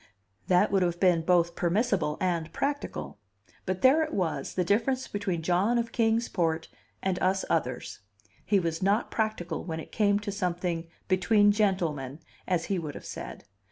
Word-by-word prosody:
That 185 +3 +4
would 195 -1 +3
have 175 -1 0
been 180 -3 +4
both 170 0 +2
permissible 180 -3 +1
and 170 -3 -1
practical; 280 - -3 0.5
but 185 0 -2
there 270 +5 +6
it 310 -1 -2
was, 180 -5 -2
the 180 - +2
difference 240 +8 +1
between 190 -5 -3
John 185 +8 +2
of 235 -1 -1
Kings 230 0 +2
Port 165 -3 -1 0.3
and 190 -1 -1
us 190 +1 +1
others; - - -2 0.4
he 205 -2 +3
was 165 -2 -2
not 200 +4 +1
practical 215 -7 -2
when 160 -2 -4
it - - -9
came 205 -2 +3
to 205 -1 -4
something 175 -3 -2 0.2
"between 205 +3 +4
gentlemen," 165 -10 0 0.3
as 175 -3 0
he 195 -2 -1
would 150 -3 -6
have - - -9
said. - - -7
185 Hz, 165 wpm, -28 LUFS, 170-210 Hz, 0.5 s, there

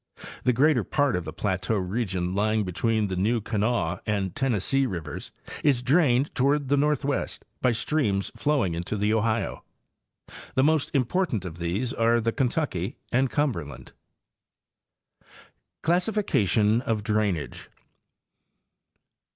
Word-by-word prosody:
The 125 - +5
greater 130 0 +3
part 145 0 +1
of 90 -2 -3
the 80 - -5
plateau 95 +4 -1
region 95 -2 -2
lying 110 +2 +1
between 110 +4 0
the 95 -2 -3
New 110 +6 +1
Kanawha 105 -5 -1
and 100 -4 -1
Tennessee 135 +2 +1
rivers 80 -8 -6 0.3
is 135 -5 +3
drained 135 -1 +3
toward 140 +1 +1
the 145 - +4
northwest 145 -1 0 0.2
by 125 - +3
streams 115 -5 0
flowing 135 - +1
into 85 +5 -3
the 105 +2 +1
Ohio. 110 +1 0 0.9
The 130 - +4
most 155 0 +2
important 130 - 0
of 85 -1 -7
these 100 +10 -1
are 115 -1 +3
the 115 0 0
Kentucky 125 - -1
and 130 +1 +2
Cumberland. 120 - -2 1.0
' - - -27
CLASSIFICATION 150 - +2
OF 110 -4 -1
DRAINAGE. 105 -7 -1
115 Hz, 125 wpm, -26 LUFS, 95-135 Hz, 1.0 s, The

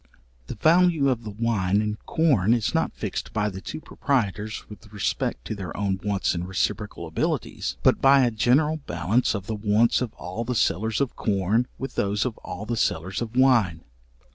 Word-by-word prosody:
The - - -5
value 165 - +4
of 120 -3 -1
the 110 - -6
wine 105 -3 0
and 105 0 -3
corn 120 - +3
is 115 -3 -1
not - - 0
fixed - - -5
by 105 -1 0
the 95 -1 -8
two 155 - -6
proprietors 110 -9 -2
with 105 -1 -13
respect 95 - -2
to - - -3
their 95 -3 -6
own 95 -1 -1
wants 100 -2 0
and 85 0 -3
reciprocal 95 -1 -2
abilities, 80 0 -2
but - - +4
by 135 0 +6
a 120 - +1
general 140 +8 +2
balance 110 +7 +1
of 100 -2 -4
the 110 - -3
wants 105 +3 +2
of 125 -4 -2
all 90 +6 -5
the 125 +1 -3
sellers 110 +1 +1
of 135 - -1
corn, 105 +4 +1
with 135 - -5
those 100 +3 0
of 125 -4 -2
all 90 +3 -7
the 120 +1 -2
sellers 95 0 -1
of 120 0 -5
wine. 115 -11 +3
110 Hz, 190 wpm, -25 LUFS, 100-125 Hz, -, by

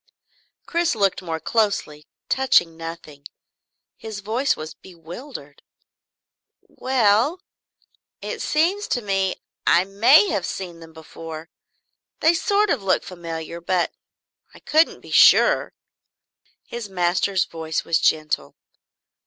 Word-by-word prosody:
Chris 340 -5 0
looked 200 -3 +1
more 165 -3 -4
closely, 200 -9 -1 0.2
touching 175 -11 +2
nothing. 165 -3 -9 0.7
His 220 -2 -8
voice 245 +8 0
was 155 0 -7
bewildered. 170 - -11 1.0
"Well 255 - +1 0.8
it - - -6
seems 360 +7 +1
to 245 - -1
me 195 -2 0 0.3
I 175 - +5
may 200 +1 +5
have 195 -4 -1
seen 175 -3 -6
them 165 -1 -13
before 160 0 -10 0.7
they 320 +2 +4
sort 405 +5 +1
of 260 - 0
look 190 -1 +1
familiar, 170 -1 -7
but 175 0 0 0.6
I - - -13
couldn't 315 +2 +2
be - - -13
sure." - - +5 0.9
His 235 -3 -7
master's 185 +1 +1
voice 160 -1 -4
was 165 -1 +2
gentle. 155 - 0
190 Hz, 110 wpm, -22 LUFS, 165-235 Hz, 1.0 s, I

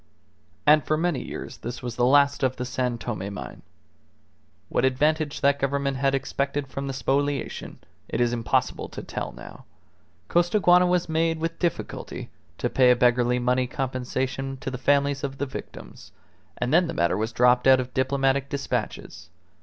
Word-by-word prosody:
And 150 +1 +6
for 155 - 0
many 170 -3 0
years - - -7
this 120 +1 -6
was 120 -2 -4
the 120 0 +2
last 140 +1 +4
of 130 -1 +1
the 125 - -4
San 125 -1 -2
Tome 105 -4 -4
mine. 100 - -8 1.1
What - - 0
advantage 150 +3 +1
that 140 0 +3
Government 140 0 0
had 135 +1 +2
expected 140 +1 -2
from 135 +1 -5
the - - -2
spoliation, 140 +1 -2 0.3
it - - -2
is 120 0 +2
impossible 115 -2 -1
to - - -8
tell - - -5
now. - - -12 0.6
Costaguana 175 - +4
was 180 -1 +1
made 165 0 +1
with 165 +1 -3
difficulty 175 -2 -3 0.3
to - - -1
pay 130 -1 +4
a 125 - +6
beggarly 125 0 +3
money 125 +1 +1
compensation 130 +1 -3
to 135 - -4
the 125 - -5
families 140 +1 +2
of 135 -1 -4
the 140 - -1
victims, - - -10 0.4
and 125 +3 -1
then 175 +1 +5
the 165 - -5
matter 85 +2 +1
dropped 125 +2 +3
out 130 -1 +7
of 130 0 -4
diplomatic 135 +1 +1
despatches. 140 -1 -4
135 Hz, 165 wpm, -25 LUFS, 125-145 Hz, 1.1 s, out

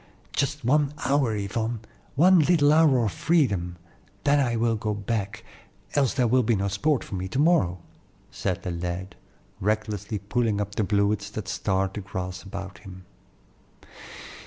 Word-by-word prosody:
Just 145 -1 -1
one 145 +2 +2
hour, 135 -4 +2
Yvonne, 110 +3 -2 0.4
one 180 +5 +6
little 150 -2 +4
hour 145 -7 +4
of 105 - -1
freedom, 135 - +1 0.5
then 145 0 +4
I 120 -4 +1
will 115 0 +1
go 105 -1 -2
back, 100 0 -3 0.5
else 140 -2 +2
there 125 -3 +2
will 125 +2 +4
be 115 -1 +2
no 100 0 -1
sport 130 +8 +1
for - - -10
me 95 0 -3
to 95 - -4
morrow," 150 - +3 0.5
said 95 -1 -3
the 90 - -3
lad, 90 +2 -4 0.4
recklessly 105 0 -1
pulling 105 +2 -1
up 100 0 -3
the 110 - 0
bluets 100 0 +1
that 105 -2 -6
starred 95 0 -1
the 105 - -5
grass 90 -1 -5
about 95 0 -8
him. 95 -2 -12
105 Hz, 160 wpm, -26 LUFS, 95-135 Hz, 0.5 s, one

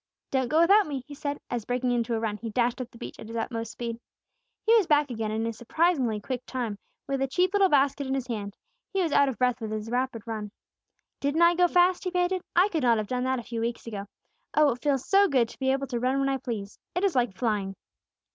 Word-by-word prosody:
"Don't 260 -2 +1
go 310 +6 +3
without 400 +3 +5
me," 275 -4 -4
he 295 - -10
said 285 0 -4
as, 240 -2 -2
breaking 245 +2 -1
into 235 -1 0
a - - -1
run, 220 -2 -2
he 225 +1 -6
dashed 240 +3 0
up 245 - -6
the 235 - -16
beach - - -8
at - - -9
his 230 - -7
utmost 230 0 -3
speed. 235 -1 -5 0.7
He 455 - +6
was 425 -7 +4
back 295 -3 +3
again 225 -2 -2
in 220 +1 -1
a 230 - -2
surprisingly 250 -1 +1
quick 250 +3 -4
time, 235 -6 -3 0.3
with 275 -1 -1
a 270 - +2
cheap 360 +8 +1
little 395 -2 +4
basket 280 -1 +2
in 265 - 0
his 265 -2 -2
hand; 210 -5 -5 0.4
he 390 -1 +1
was 330 - -1
out 280 -1 +4
of 260 - -5
breath 250 -1 +1
with 220 - -3
his 215 +1 -4
rapid 245 -3 -1
run. 215 -2 -4 0.7
"Didn't 285 +4 +2
I 340 +1 +6
go 355 0 +4
fast?" 355 +1 +3
he 365 - -1
panted. 360 +1 0
"I 360 +3 +6
could 325 -6 -1
not 235 -3 +4
have 215 - -1
done 250 0 -1
that 260 0 +1
a 240 - -5
few 230 0 -4
weeks 235 0 -3
ago. 205 -3 -6 0.5
Oh, 300 -2 +5
it 245 - -6
feels 275 -3 0
so 400 +1 +5
good 255 -8 +2
to - - -14
be 265 -1 +2
able 270 +1 0
to 245 -3 -3
run 255 +3 +1
when 275 0 +1
I 270 - +1
please! 215 -5 -6 0.2
It 360 - 0
is 390 -3 +3
like 240 -7 +1
flying." 205 -5 -1
255 Hz, 260 wpm, -27 LUFS, 230-295 Hz, 0.7 s, He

